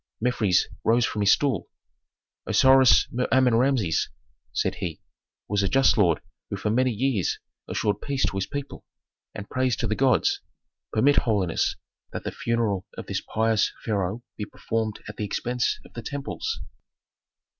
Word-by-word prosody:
Mefres 110 -6 +2 0.2
rose 115 +1 +3
from 105 - -2
his 100 - +5
stool. 135 -9 +1 0.8
"Osiris 130 -2 +6
Mer 125 +1 -1
Amen 130 -2 +4
Rameses," 115 - +2 0.4
said - - 0
he, 85 -3 -3 0.5
"was 100 0 +1
a 95 - +1
just 135 0 +4
lord 90 -7 +3 0.3
who - - -3
for 105 - -1
many 130 +3 +3
years 120 -4 0 0.3
assured 105 -1 -1
peace 140 -2 0
to - - -2
his 95 0 -1
people, 145 +2 -6 0.5
and 100 -1 -6
praise 130 -2 0
to 115 - -2
the 110 - 0
gods. 130 +3 +2 0.5
Permit, 140 +6 +3
holiness, 100 -7 +1 0.4
that - - -4
the - - -3
funeral 110 -5 -1
of - - -6
this - - -2
pious 110 -1 +1
pharaoh 105 +1 -1
be 105 - -3
performed 110 0 -3
at 105 - -8
the - - -3
expense 120 +4 -1
of - - -16
the 115 - -6
temples." 140 - -4
115 Hz, 155 wpm, -25 LUFS, 105-130 Hz, 0.8 s, Osiris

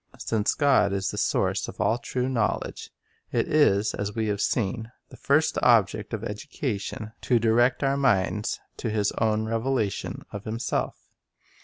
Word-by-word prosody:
Since 110 -2 0
God 135 -9 +3
is 95 0 -1
the - - -7
source - - 0
of - - -9
all 115 - +2
true 125 +1 -2
knowledge, 120 -5 -2 0.4
it - - +1
is, 110 -9 +3
Hwehition - - -8
as 105 0 -3
we 110 -1 0
have 105 0 -1
seen, 115 0 -1 0.2
the - - -12
first 155 +3 +2
object 105 -3 +3
of 110 -2 -4
education 110 -2 -4
to 125 - +2
direct 120 +4 +3
our 135 0 +2
minds 105 -4 +1 0.2
to 115 - -3
His 105 -1 +1
own 110 -1 +1
revelation 115 -2 -1
of 100 -1 -7
Himself. 115 +3 -2
110 Hz, 160 wpm, -26 LUFS, 105-125 Hz, 0.4 s, God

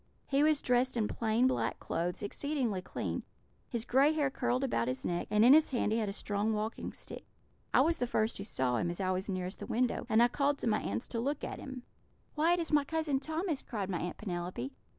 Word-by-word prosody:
He 275 +1 +2
was 305 -1 +3
dressed 250 0 +2
in 215 -2 +1
plain 225 +3 +1
black 260 - +1
clothes, 175 +3 -2
exceedingly 245 -3 -1
clean; - - -3 0.5
his 235 -1 -3
gray 275 +5 +4
hair 290 -3 +1
curled 250 0 0
about 170 - 0
his 130 0 -3
neck, 175 0 -1
and 210 +1 +4
in 255 - +9
his 310 +1 +6
hand 240 -5 0
he 225 - +2
had 215 -3 -1
a - - -2
strong 205 +2 -1
walking 215 +1 -3
stick. - - -9 0.5
I - - +5
was 330 0 +2
the 245 - 0
first 220 -2 0
who - - -3
saw 130 - 0
him, 170 - 0
as 175 - -4
I 185 -1 +1
was 185 +2 -2
nearest 185 0 -3
the - - -6
window, 245 0 0
and 220 +1 +5
I - - +6
called 280 +3 +1
to - - -3
my 215 -1 +2
aunts 105 +3 -3
to 230 - -2
look 280 +5 -2
at - - -4
him. 265 -3 -7 0.5
"'Why, 320 +3 +3
it 350 - +1
is 330 - -3
my 295 -1 +4
Cousin 310 -2 0
Thomas!' 315 +1 -2
cried 200 -5 -4
my 175 - -1
Aunt 175 - -4
Penelope. 175 - -4
235 Hz, 235 wpm, -32 LUFS, 195-280 Hz, 0.5 s, in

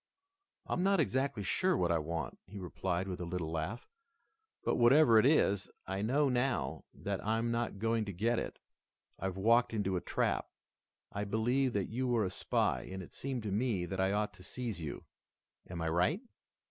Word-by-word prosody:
"I'm - - -1
not 195 0 +3
exactly 135 -6 0
sure 185 - +2
what 85 -1 +2
I 85 - +3
want," 80 -2 -4
he 105 - -9
replied 95 0 -2
with 90 -2 -4
a - - -3
little 85 -2 -3
laugh, 85 +9 -3 0.8
"but - - +1
whatever 120 -1 +7
it 120 - +5
is, 100 -10 +3 0.2
I 95 +1 -3
know 140 +7 +2
now 125 - 0
that 100 -1 -4
I'm 115 +2 +1
not 115 -3 -1
going 115 +1 +1
to 100 - -4
get 115 +6 +1
it. - - -5 0.6
I've 95 0 -3
walked 115 +3 +4
into 95 -3 0
a - - -2
trap. - - 0 0.6
I 100 - -2
believed 120 +5 +1
that 100 -2 0
you 130 +3 -1
were 120 -4 +2
a 90 - -2
spy, - - +1
and 95 0 -5
it - - -14
seemed 130 -4 -4
to 105 - -3
me 105 -4 0
that 95 +2 -4
I 95 +1 +2
ought 105 +1 0
to - - -16
seize 115 -3 -4
you. 75 -3 -5 0.7
Am 85 -1 -4
I - - 0
right?" 90 - +2
105 Hz, 190 wpm, -33 LUFS, 90-120 Hz, 0.8 s, whatever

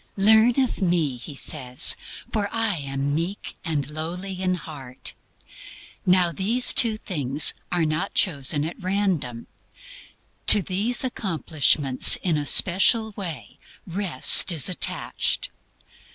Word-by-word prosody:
"Learn 220 +5 +3
of 260 -5 -2
me," 170 -7 -1
He 130 +4 -11
says, 125 -1 +1 0.4
"for 205 -2 -2
I 225 -5 -1
am 140 0 -4
meek 170 +6 -5
and 150 -5 -4
lowly 180 +5 -7
in 185 -1 -1
heart." 140 -6 -8 0.9
Now 180 -1 +3
these 220 +8 +1
two 225 -3 +4
things 145 - +2 0.2
are 175 -2 0
not 155 +5 -4
chosen 145 -4 0
at 165 - -9
random. 180 - -3 1.0
To 205 - +8
these 210 +9 +1
accomplishments, 155 - +2
in 175 -4 -2
a 145 -1 -4
special 215 - +2
way, 160 - -9 0.3
Rest 180 -3 +3
is 160 -2 +1
attached. 180 - -2
175 Hz, 120 wpm, -22 LUFS, 145-200 Hz, 1.0 s, To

